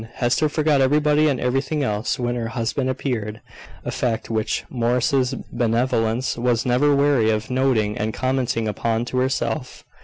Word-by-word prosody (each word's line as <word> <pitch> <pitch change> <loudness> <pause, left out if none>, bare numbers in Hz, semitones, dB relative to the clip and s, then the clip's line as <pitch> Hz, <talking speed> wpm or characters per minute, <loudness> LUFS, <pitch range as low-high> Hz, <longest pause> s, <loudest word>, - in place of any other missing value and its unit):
Hester 125 +5 +1
forgot 150 -2 +2
everybody 150 +2 +3
and 140 -4 +1
everything 135 +4 0
else 105 -2 -1
when 120 -1 -1
her 120 -2 -3
husband 120 +3 -2
appeared 115 -5 -3 0.5
a - - -2
fact 115 -1 -2
which 110 -1 -1
Morris's 125 +2 +1 0.2
benevolence 120 +1 0
was 120 -1 +1
never 135 +4 +3
weary 140 -5 +3
of 110 +2 -1
noting 125 -5 +1
and 110 +1 -1
commenting 125 -2 -1
upon 115 +2 -1
to 125 +1 -2
herself. 130 +1 -2
125 Hz, 150 wpm, -22 LUFS, 115-135 Hz, 0.5 s, everybody